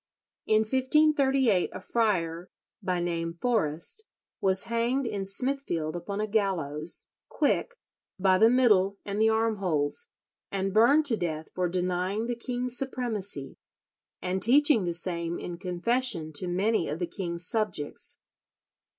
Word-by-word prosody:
In 215 Hz, 0 st, +4 dB
1538 265 Hz, -, +2 dB
a -, -, -6 dB
friar, 180 Hz, -6 st, -1 dB, 0.3 s
by 185 Hz, -2 st, -1 dB
name 165 Hz, -1 st, -2 dB
Forrest, 205 Hz, -, +1 dB, 0.3 s
was 190 Hz, -1 st, +2 dB
hanged 235 Hz, +4 st, 0 dB
in 200 Hz, -4 st, -3 dB
Smithfield 195 Hz, -, -2 dB
upon 200 Hz, +4 st, -5 dB
a 215 Hz, -, 0 dB
gallows, 175 Hz, -8 st, -1 dB, 0.2 s
quick, 480 Hz, -, 0 dB, 0.4 s
by 185 Hz, -1 st, +3 dB
the 225 Hz, -, +7 dB
middle 210 Hz, -6 st, +3 dB
and 205 Hz, +1 st, -2 dB
the 220 Hz, -, +5 dB
arm 220 Hz, 0 st, +1 dB
holes, 155 Hz, -7 st, -1 dB, 0.4 s
and 195 Hz, -1 st, -2 dB
burned 260 Hz, +8 st, +5 dB
to 240 Hz, -6 st, +4 dB
death 160 Hz, -4 st, -4 dB
for 180 Hz, -1 st, -1 dB
denying 185 Hz, +4 st, -1 dB
the 240 Hz, -, -2 dB
king's 245 Hz, +1 st, -3 dB
supremacy 225 Hz, -, -3 dB, 0.7 s
and 185 Hz, +1 st, -1 dB
teaching 265 Hz, -1 st, +5 dB
the 170 Hz, -, -1 dB
same 170 Hz, -1 st, -3 dB
in 170 Hz, -1 st, -7 dB
confession 180 Hz, -2 st, -1 dB
to 180 Hz, +5 st, -1 dB
many 190 Hz, +2 st, +1 dB
of 150 Hz, -, -3 dB
the 175 Hz, -, -2 dB
king's 170 Hz, -2 st, -3 dB
subjects. 205 Hz, -10 st, 0 dB
195 Hz, 135 wpm, -28 LUFS, 175-235 Hz, 0.7 s, the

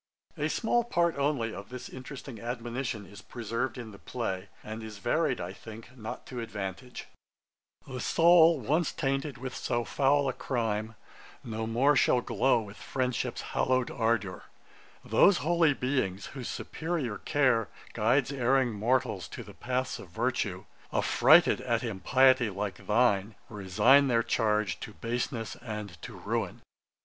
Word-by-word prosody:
A 150 Hz, +1 st, -1 dB
small 240 Hz, +4 st, +1 dB
part 170 Hz, -7 st, +1 dB
only 140 Hz, -6 st, 0 dB
of 100 Hz, 0 st, -8 dB
this 125 Hz, 0 st, -7 dB
interesting 130 Hz, -2 st, -9 dB
admonition 120 Hz, -1 st, -4 dB
is 100 Hz, -, -12 dB
preserved 115 Hz, +2 st, -3 dB
in 115 Hz, -3 st, -7 dB
the 100 Hz, -, -13 dB
play, 95 Hz, -7 st, -4 dB
and 110 Hz, +1 st, -6 dB
is 110 Hz, -2 st, -8 dB
varied, 130 Hz, +5 st, 0 dB
I 90 Hz, +2 st, -5 dB
think, 115 Hz, +4 st, -11 dB
not 110 Hz, -3 st, -7 dB
to 125 Hz, -, -6 dB
advantage: 105 Hz, +1 st, -6 dB, 0.8 s
'The 130 Hz, -1 st, -6 dB
soul 165 Hz, +2 st, +5 dB
once 150 Hz, +7 st, +1 dB
tainted 135 Hz, +1 st, -2 dB
with 130 Hz, +1 st, -6 dB
so 120 Hz, 0 st, -1 dB
foul 140 Hz, 0 st, +2 dB
a 130 Hz, -, 0 dB
crime, 110 Hz, -4 st, -2 dB, 0.5 s
No 110 Hz, -1 st, -4 dB
more 130 Hz, +6 st, +3 dB
shall 125 Hz, -1 st, +4 dB
glow 120 Hz, +1 st, +2 dB
with 105 Hz, -1 st, -10 dB
friendship's 125 Hz, -2 st, -2 dB
hallow'd 130 Hz, -1 st, +1 dB
ardour, 110 Hz, -6 st, -1 dB, 0.6 s
Those 200 Hz, -2 st, +5 dB
holy 165 Hz, -3 st, +3 dB
beings 125 Hz, -8 st, -1 dB
whose 130 Hz, -3 st, -6 dB
superior 155 Hz, -10 st, -3 dB
care 130 Hz, -7 st, +2 dB, 0.2 s
Guides -, -, +2 dB
erring 130 Hz, -1 st, +2 dB
mortals 110 Hz, -5 st, 0 dB
to -, -, -8 dB
the -, -, -12 dB
paths 130 Hz, +2 st, -2 dB
of 95 Hz, -, -11 dB
virtue, 100 Hz, -3 st, -2 dB, 0.3 s
Affrighted 155 Hz, +7 st, +5 dB
at 120 Hz, -1 st, 0 dB
impiety 125 Hz, +3 st, +3 dB
like 100 Hz, 0 st, -5 dB
thine, 105 Hz, -2 st, +2 dB
Resign 105 Hz, +7 st, +4 dB
their 115 Hz, -2 st, +2 dB
charge 110 Hz, -2 st, 0 dB
to 105 Hz, -, -8 dB
baseness 115 Hz, 0 st, -3 dB
and 105 Hz, -8 st, -7 dB
to -, -, -8 dB
ruin.' -, -, -3 dB
120 Hz, 145 wpm, -29 LUFS, 110-135 Hz, 0.8 s, soul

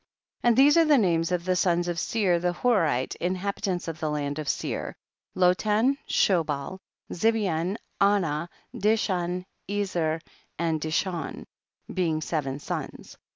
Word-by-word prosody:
26. 240 Hz, -, +3 dB
And 230 Hz, -, +3 dB
these 290 Hz, +4 st, +6 dB
are 330 Hz, -, +6 dB
the 300 Hz, -2 st, +5 dB
names 170 Hz, -6 st, +2 dB
of 175 Hz, -1 st, -1 dB
the 185 Hz, 0 st, +2 dB
sons 175 Hz, -1 st, +2 dB
of 175 Hz, -1 st, -1 dB
Seir 190 Hz, -5 st, +1 dB
the 175 Hz, 0 st, 0 dB
Horite, 170 Hz, -, +1 dB
inhab 185 Hz, +3 st, -1 dB
itants 180 Hz, -3 st, -2 dB
of 160 Hz, -1 st, -5 dB
the 155 Hz, -, -1 dB
land 145 Hz, 0 st, -2 dB
of 150 Hz, -, -3 dB
Seir, -, -, -3 dB, 0.4 s
Lotan, 210 Hz, +8 st, +3 dB
Shobal, 165 Hz, -2 st, +1 dB, 0.3 s
Zibean, 195 Hz, -3 st, +1 dB, 0.2 s
Anah, 175 Hz, -5 st, +2 dB, 0.2 s
Dishan, 185 Hz, -4 st, 0 dB, 0.2 s
Ezer 180 Hz, -6 st, -1 dB, 0.4 s
and 165 Hz, -2 st, 0 dB
Dishon, 160 Hz, +1 st, -2 dB, 0.5 s
being 165 Hz, -4 st, 0 dB
seven 145 Hz, -4 st, -2 dB
sons. 145 Hz, -, -6 dB
180 Hz, 140 wpm, -26 LUFS, 160-200 Hz, 0.5 s, these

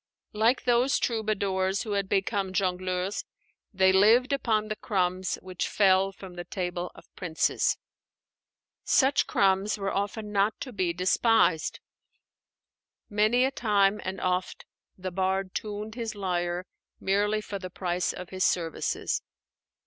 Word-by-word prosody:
Like 225 Hz, +4 st, +2 dB
those 245 Hz, +2 st, +3 dB
troubadours 200 Hz, -4 st, 0 dB
who 220 Hz, -, -5 dB
had 200 Hz, -1 st, -1 dB
become 195 Hz, -1 st, 0 dB
jongleurs, 185 Hz, +1 st, -1 dB, 0.5 s
they 190 Hz, -2 st, +4 dB
lived 230 Hz, +7 st, +5 dB
upon 220 Hz, -6 st, +1 dB
the 215 Hz, -, -3 dB
crumbs 185 Hz, -4 st, -1 dB
which 185 Hz, -1 st, -3 dB
fell 195 Hz, -1 st, +3 dB
from 190 Hz, -1 st, -11 dB
the 175 Hz, 0 st, -6 dB
table 180 Hz, -1 st, -3 dB
of -, -, -18 dB
princes. 170 Hz, -4 st, 0 dB, 1.1 s
Such 270 Hz, +1 st, +3 dB
crumbs 195 Hz, +2 st, +2 dB
were 195 Hz, -1 st, -2 dB
often 210 Hz, +1 st, -3 dB
not 205 Hz, +1 st, +1 dB
to 255 Hz, -, -6 dB
be 185 Hz, -4 st, 0 dB
despised. 180 Hz, 0 st, +2 dB, 1.3 s
Many 215 Hz, +5 st, +3 dB
a 265 Hz, -, 0 dB
time 205 Hz, -5 st, +2 dB
and 190 Hz, +1 st, -4 dB
oft 180 Hz, 0 st, -2 dB, 0.3 s
the 185 Hz, 0 st, -5 dB
bard 190 Hz, +1 st, -1 dB
tuned 210 Hz, 0 st, -4 dB
his 230 Hz, -2 st, -4 dB
lyre 180 Hz, -2 st, -2 dB, 0.3 s
merely 205 Hz, +2 st, +1 dB
for 205 Hz, -1 st, -6 dB
the 185 Hz, -1 st, -6 dB
price 180 Hz, -1 st, -1 dB
of 180 Hz, -1 st, -8 dB
his 185 Hz, 0 st, -1 dB
services. 165 Hz, -3 st, 0 dB
195 Hz, 135 wpm, -28 LUFS, 185-215 Hz, 1.3 s, lived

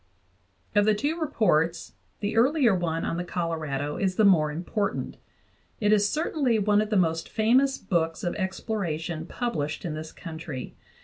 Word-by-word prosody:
Of 205 Hz, -1 st, +4 dB
the 215 Hz, 0 st, +4 dB
two 295 Hz, +10 st, -1 dB
reports 175 Hz, -, +1 dB, 0.3 s
the 205 Hz, +1 st, -2 dB
earlier 255 Hz, 0 st, +4 dB
one 165 Hz, -3 st, -1 dB
on 165 Hz, -, -2 dB
the 175 Hz, -, -2 dB
Colorado 155 Hz, -5 st, -3 dB
is 190 Hz, -2 st, 0 dB
the 215 Hz, -, +4 dB
more 155 Hz, -6 st, +5 dB
important; 190 Hz, +6 st, -3 dB, 0.6 s
it 210 Hz, -1 st, +3 dB
is 205 Hz, -1 st, +3 dB
certainly 295 Hz, -5 st, +1 dB
one 210 Hz, 0 st, +3 dB
of 215 Hz, -, -2 dB
the 215 Hz, -, +2 dB
most 165 Hz, -2 st, +1 dB
famous 255 Hz, +5 st, +3 dB
books 165 Hz, -4 st, -1 dB
of 175 Hz, -, -1 dB
exploration 175 Hz, -5 st, -3 dB
published 160 Hz, -, -3 dB
in 165 Hz, -, -2 dB
this 155 Hz, +1 st, -6 dB
country. 160 Hz, -5 st, -7 dB
190 Hz, 160 wpm, -26 LUFS, 165-215 Hz, 0.6 s, more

